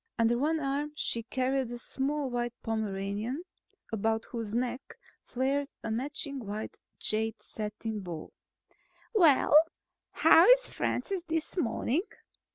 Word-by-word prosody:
Under 230 Hz, +1 st, +3 dB
one 305 Hz, +6 st, +1 dB
arm 290 Hz, +1 st, -2 dB
she 235 Hz, -5 st, 0 dB
carried 260 Hz, +2 st, -1 dB
a 240 Hz, -, -5 dB
small 275 Hz, +2 st, -2 dB
white 240 Hz, -1 st, -2 dB
Pomeranian 215 Hz, -, -2 dB, 0.5 s
about 220 Hz, +1 st, 0 dB
whose 225 Hz, -3 st, -4 dB
neck 250 Hz, +2 st, -3 dB, 0.3 s
flared 275 Hz, +3 st, 0 dB, 0.2 s
a 225 Hz, -, -3 dB
matching 280 Hz, +3 st, -3 dB
wide 210 Hz, +1 st, -5 dB, 0.2 s
jade 220 Hz, +1 st, -1 dB
satin 215 Hz, 0 st, -5 dB
bow. 175 Hz, -5 st, -7 dB, 0.8 s
"Well, 330 Hz, -, +5 dB, 0.6 s
how -, -, +7 dB
is -, -, +5 dB
Francis 390 Hz, -3 st, -1 dB
this 320 Hz, -1 st, -2 dB
morning?" 270 Hz, -1 st, 0 dB
245 Hz, 120 wpm, -30 LUFS, 220-285 Hz, 0.8 s, how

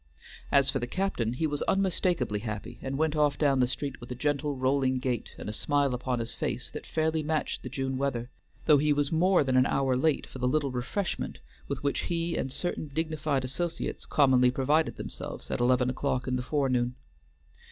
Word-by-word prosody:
As 140 Hz, -1 st, +5 dB
for 135 Hz, -, -1 dB
the 120 Hz, -, -3 dB
captain, 125 Hz, -, -1 dB
he 145 Hz, +6 st, -1 dB
was 145 Hz, -2 st, -1 dB
unmistakably 180 Hz, -, +1 dB
happy, 110 Hz, +2 st, -6 dB
and 135 Hz, 0 st, -3 dB
went 155 Hz, 0 st, +1 dB
off 150 Hz, -2 st, +2 dB
down 140 Hz, -3 st, +3 dB
the 125 Hz, -, +4 dB
street 140 Hz, +1 st, -4 dB
with 120 Hz, -, -9 dB
a 125 Hz, -, -4 dB
gentle, 145 Hz, +2 st, 0 dB
rolling 130 Hz, 0 st, +2 dB
gait, 125 Hz, -2 st, -3 dB
and -, -, -7 dB
a 105 Hz, -, -3 dB
smile 140 Hz, +2 st, +1 dB
upon 125 Hz, 0 st, -1 dB
his 115 Hz, 0 st, -3 dB
face -, -, -2 dB
that -, -, -7 dB
fairly 160 Hz, 0 st, 0 dB
matched 155 Hz, 0 st, -1 dB
the -, -, -6 dB
June 135 Hz, -1 st, -2 dB
weather, 125 Hz, -3 st, -2 dB, 0.3 s
though 150 Hz, -3 st, +6 dB
he 150 Hz, +1 st, +3 dB
was 145 Hz, -1 st, 0 dB
more 180 Hz, +1 st, +4 dB
than 130 Hz, -2 st, 0 dB
an 130 Hz, 0 st, +5 dB
hour 135 Hz, -2 st, +1 dB
late 145 Hz, +3 st, +1 dB
for 130 Hz, -, -10 dB
the 125 Hz, -, +1 dB
little 145 Hz, 0 st, +1 dB
refreshment 130 Hz, +10 st, -3 dB, 0.3 s
with -, -, -4 dB
which 140 Hz, -, 0 dB
he 170 Hz, 0 st, 0 dB
and 130 Hz, -, -2 dB
certain 175 Hz, 0 st, -3 dB
dignified 155 Hz, -2 st, -1 dB
associates 165 Hz, +6 st, -3 dB
commonly 130 Hz, -3 st, +5 dB
provided 140 Hz, +5 st, +1 dB
themselves -, -, -7 dB
at -, -, -1 dB
eleven 125 Hz, +1 st, +3 dB
o'clock 130 Hz, 0 st, -1 dB
in 130 Hz, -, 0 dB
the 125 Hz, -, -1 dB
forenoon. 125 Hz, -3 st, 0 dB
135 Hz, 200 wpm, -29 LUFS, 125-155 Hz, 0.3 s, though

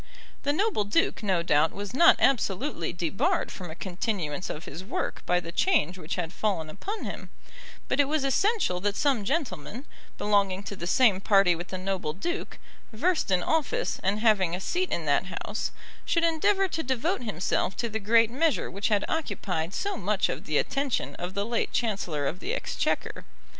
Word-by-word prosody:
The 285 Hz, -, +1 dB
noble 375 Hz, -, +1 dB
duke 205 Hz, +1 st, +1 dB
no 190 Hz, -5 st, +1 dB
doubt 155 Hz, -1 st, +3 dB
was 200 Hz, +1 st, -6 dB
not 335 Hz, +6 st, +7 dB
absolutely 235 Hz, -, +1 dB
debarred 175 Hz, +1 st, 0 dB
from 180 Hz, -3 st, -7 dB
a 160 Hz, -, -7 dB
continuance 180 Hz, -4 st, -3 dB
of 155 Hz, -, -6 dB
his 165 Hz, +6 st, -7 dB
work 190 Hz, -, -3 dB
by 180 Hz, 0 st, +3 dB
the 170 Hz, -1 st, -7 dB
change 235 Hz, -, +2 dB
which 155 Hz, -, -4 dB
had 175 Hz, -1 st, -3 dB
fallen 170 Hz, -8 st, -1 dB
upon 415 Hz, -, -5 dB
him; -, -, -6 dB, 0.6 s
but -, -, 0 dB
it 285 Hz, -, +5 dB
was 300 Hz, -1 st, 0 dB
essential 275 Hz, -, +2 dB
that 205 Hz, +2 st, -1 dB
some 265 Hz, -6 st, +1 dB
gentleman, 260 Hz, -, -3 dB, 0.3 s
belonging 200 Hz, -2 st, +1 dB
to 200 Hz, -, -6 dB
the 170 Hz, -2 st, -5 dB
same 205 Hz, -2 st, +4 dB
party 195 Hz, -3 st, +5 dB
with 175 Hz, +2 st, -5 dB
the 185 Hz, -, -5 dB
noble 185 Hz, -4 st, -2 dB
duke, 340 Hz, -, -4 dB, 0.3 s
versed 315 Hz, -, +1 dB
in 180 Hz, -2 st, +2 dB
office, 325 Hz, -, 0 dB
and 200 Hz, +3 st, 0 dB
having 195 Hz, -7 st, +3 dB
a -, -, -4 dB
seat 365 Hz, -, -1 dB
in 165 Hz, -, -1 dB
that 145 Hz, +4 st, +2 dB
House, 205 Hz, +4 st, -3 dB, 0.3 s
should 335 Hz, -, +1 dB
endeavour 385 Hz, +4 st, +3 dB
to 325 Hz, -2 st, -3 dB
devote 265 Hz, +7 st, -1 dB
himself 195 Hz, -3 st, -1 dB
to 235 Hz, -, -1 dB
the 220 Hz, -1 st, -3 dB
great 225 Hz, +2 st, +4 dB
measure 300 Hz, +3 st, +1 dB
which 200 Hz, +2 st, -1 dB
had 205 Hz, -2 st, +2 dB
occupied 180 Hz, -, -2 dB
so 400 Hz, -, -2 dB
much -, -, 0 dB
of -, -, -4 dB
the -, -, +1 dB
attention 275 Hz, -2 st, 0 dB
of 180 Hz, +1 st, -5 dB
the 200 Hz, 0 st, 0 dB
late 235 Hz, +1 st, -1 dB
Chancellor 195 Hz, -10 st, -1 dB
of 165 Hz, +6 st, -2 dB
the -, -, -2 dB
Exchequer. -, -, -2 dB
205 Hz, 185 wpm, -27 LUFS, 180-280 Hz, 0.6 s, not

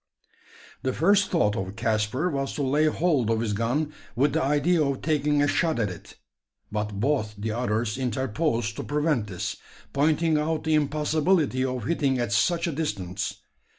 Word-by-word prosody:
The 130 Hz, -, -1 dB
first 200 Hz, +6 st, +3 dB
thought 105 Hz, -, +2 dB
of 95 Hz, +1 st, -4 dB
Caspar 115 Hz, +8 st, 0 dB
was 135 Hz, -1 st, -2 dB
to 145 Hz, -, -1 dB
lay 145 Hz, +4 st, +2 dB
hold 150 Hz, -7 st, +1 dB
of 115 Hz, -1 st, +2 dB
his 110 Hz, -2 st, -1 dB
gun 130 Hz, +8 st, -1 dB, 0.2 s
with 140 Hz, +5 st, +2 dB
the -, -, +1 dB
idea 150 Hz, +4 st, +2 dB
of 140 Hz, -2 st, -2 dB
taking 150 Hz, -2 st, +2 dB
a -, -, +3 dB
shot 160 Hz, +2 st, +1 dB
at 105 Hz, -5 st, 0 dB
it; 90 Hz, -, -11 dB, 0.6 s
but 105 Hz, -1 st, -3 dB
both 110 Hz, -4 st, 0 dB
the 110 Hz, +2 st, -3 dB
others 115 Hz, 0 st, -1 dB
interposed 125 Hz, -1 st, -1 dB
to -, -, -3 dB
prevent 145 Hz, -6 st, 0 dB
this 90 Hz, -3 st, -4 dB, 0.4 s
pointing 155 Hz, +2 st, +2 dB
out 155 Hz, +1 st, -1 dB
the 160 Hz, -, +1 dB
impossibility 150 Hz, -1 st, +2 dB
of 130 Hz, -3 st, -2 dB
hitting 140 Hz, -4 st, +1 dB
at 120 Hz, -4 st, -1 dB
such 170 Hz, -, +2 dB
a 170 Hz, -, -1 dB
distance. 100 Hz, -, -3 dB
135 Hz, 170 wpm, -26 LUFS, 115-155 Hz, 0.6 s, first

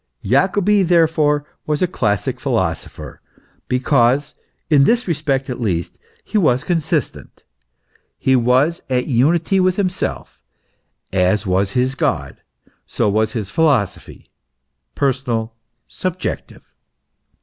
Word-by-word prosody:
Jacobi 200 Hz, +1 st, +2 dB
therefore 160 Hz, -4 st, +2 dB, 0.2 s
was 150 Hz, +2 st, 0 dB
a -, -, +3 dB
classic 105 Hz, -, -1 dB
philosopher, -, -, -3 dB, 0.5 s
be 125 Hz, -, 0 dB
cause 135 Hz, +1 st, +2 dB, 0.3 s
(in 145 Hz, -3 st, +4 dB
this 240 Hz, +4 st, +2 dB
respect, 145 Hz, -5 st, -1 dB
at 125 Hz, -1 st, -5 dB
least) 90 Hz, -7 st, -2 dB, 0.2 s
he 215 Hz, -, 0 dB
was 130 Hz, -8 st, +2 dB
consistent, 165 Hz, -4 st, -2 dB, 0.7 s
he 130 Hz, -, +2 dB
was 130 Hz, +7 st, +2 dB
at 125 Hz, -1 st, 0 dB
unity 160 Hz, +9 st, +2 dB
with 185 Hz, -1 st, +2 dB
himself; 190 Hz, -2 st, -3 dB, 0.7 s
as 95 Hz, +3 st, +2 dB
was 95 Hz, +1 st, 0 dB
his 130 Hz, +1 st, +1 dB
God, 70 Hz, -, -2 dB, 0.5 s
so -, -, -1 dB
was 110 Hz, +2 st, +1 dB
his 105 Hz, -4 st, -4 dB
philosophy 135 Hz, -, -1 dB, 0.6 s
personal, 125 Hz, -5 st, -1 dB, 0.3 s
subjective. 185 Hz, 0 st, -5 dB
135 Hz, 110 wpm, -19 LUFS, 115-165 Hz, 0.7 s, in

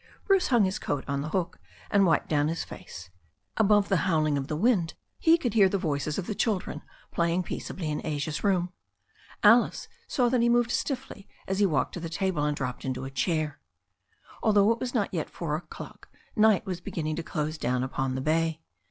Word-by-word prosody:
Bruce 390 Hz, -2 st, +3 dB
hung 240 Hz, -5 st, +4 dB
his 190 Hz, +1 st, -2 dB
coat 140 Hz, -2 st, -2 dB
on 140 Hz, -1 st, -1 dB
the 150 Hz, -, -4 dB
door, 175 Hz, +1 st, -1 dB, 0.4 s
and 200 Hz, -2 st, +5 dB
wiped 165 Hz, -, +2 dB
down 145 Hz, -1 st, +2 dB
his 165 Hz, +1 st, -2 dB
face. 90 Hz, +2 st, -10 dB, 0.4 s
Above 205 Hz, -1 st, +4 dB
the 195 Hz, -, +2 dB
howling 155 Hz, -3 st, +2 dB
of 135 Hz, -1 st, -2 dB
the 150 Hz, -, -2 dB
wind 180 Hz, -2 st, +2 dB, 0.2 s
he 330 Hz, +1 st, +5 dB
could 245 Hz, -10 st, -2 dB
hear 200 Hz, -4 st, +5 dB
the 200 Hz, -, 0 dB
voices 150 Hz, -4 st, -2 dB
of 195 Hz, -, -2 dB
the 215 Hz, -, -3 dB
children 205 Hz, -2 st, -1 dB, 0.3 s
playing 170 Hz, +2 st, +1 dB
peaceably 175 Hz, -1 st, -5 dB
in 150 Hz, -1 st, -2 dB
Asia's 150 Hz, 0 st, -3 dB
room. 180 Hz, -3 st, +1 dB, 0.7 s
Alice 230 Hz, +3 st, +5 dB, 0.2 s
saw 250 Hz, -4 st, +2 dB
that 245 Hz, 0 st, +2 dB
he 235 Hz, -, +3 dB
moved 240 Hz, 0 st, +3 dB
stiffly 260 Hz, -8 st, -3 dB, 0.2 s
as 190 Hz, +1 st, -1 dB
he 205 Hz, -, +5 dB
walked 160 Hz, -, 0 dB
to -, -, -5 dB
the 165 Hz, -1 st, -5 dB
table 170 Hz, -2 st, -1 dB
and 150 Hz, 0 st, 0 dB
dropped 125 Hz, -2 st, -4 dB
into 130 Hz, 0 st, -3 dB
a 135 Hz, -, -6 dB
chair. 155 Hz, +2 st, -1 dB, 0.8 s
Although 210 Hz, -1 st, +4 dB
it 230 Hz, -, 0 dB
was 250 Hz, +1 st, -4 dB
not 205 Hz, -5 st, 0 dB
yet 165 Hz, -4 st, -2 dB
four 160 Hz, -3 st, -3 dB
o'clock 160 Hz, -, -9 dB, 0.3 s
night 215 Hz, -3 st, +4 dB
was 180 Hz, -3 st, -4 dB
beginning 155 Hz, -3 st, -3 dB
to -, -, -1 dB
dose 155 Hz, 0 st, -3 dB
down 125 Hz, +1 st, 0 dB
upon 130 Hz, 0 st, -2 dB
the 130 Hz, -, -2 dB
bay. 160 Hz, +2 st, +1 dB
170 Hz, 205 wpm, -27 LUFS, 150-205 Hz, 0.8 s, and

